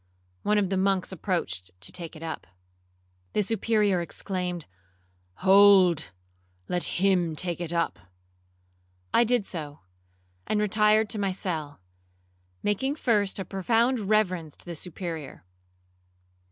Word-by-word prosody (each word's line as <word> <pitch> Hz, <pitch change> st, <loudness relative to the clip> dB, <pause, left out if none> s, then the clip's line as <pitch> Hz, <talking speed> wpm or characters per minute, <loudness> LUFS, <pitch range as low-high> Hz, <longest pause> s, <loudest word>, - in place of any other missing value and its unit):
One 210 Hz, 0 st, +2 dB
of 200 Hz, -2 st, +1 dB
the 190 Hz, -, +1 dB
monks 190 Hz, -1 st, +1 dB
approached 160 Hz, -, -3 dB
to 90 Hz, -, -5 dB
take 170 Hz, -2 st, -6 dB
it 155 Hz, -, -10 dB
up. 160 Hz, -, -5 dB, 0.9 s
The 210 Hz, -, +2 dB
Superior 210 Hz, -3 st, +1 dB
exclaimed, 180 Hz, -1 st, -4 dB, 0.8 s
'Hold, 190 Hz, -4 st, +6 dB, 0.6 s
let 175 Hz, -1 st, 0 dB
him 180 Hz, -4 st, +2 dB
take 175 Hz, +1 st, -1 dB
it 170 Hz, -1 st, -3 dB
up.' 170 Hz, -, -1 dB, 1.1 s
I 235 Hz, -, +6 dB
did 240 Hz, -2 st, +1 dB
so, 150 Hz, -6 st, -6 dB, 0.7 s
and 215 Hz, -, +1 dB
retired 210 Hz, +1 st, +3 dB
to 215 Hz, -, -2 dB
my 195 Hz, -1 st, 0 dB
cell, 160 Hz, -, -4 dB, 0.8 s
making 265 Hz, +8 st, 0 dB
first 210 Hz, -9 st, +1 dB
a 195 Hz, -, -4 dB
profound 230 Hz, +7 st, +1 dB
reverence 185 Hz, -8 st, +1 dB
to -, -, -16 dB
the 175 Hz, -1 st, -6 dB
Superior. 165 Hz, -, -6 dB
190 Hz, 125 wpm, -27 LUFS, 170-210 Hz, 1.1 s, Hold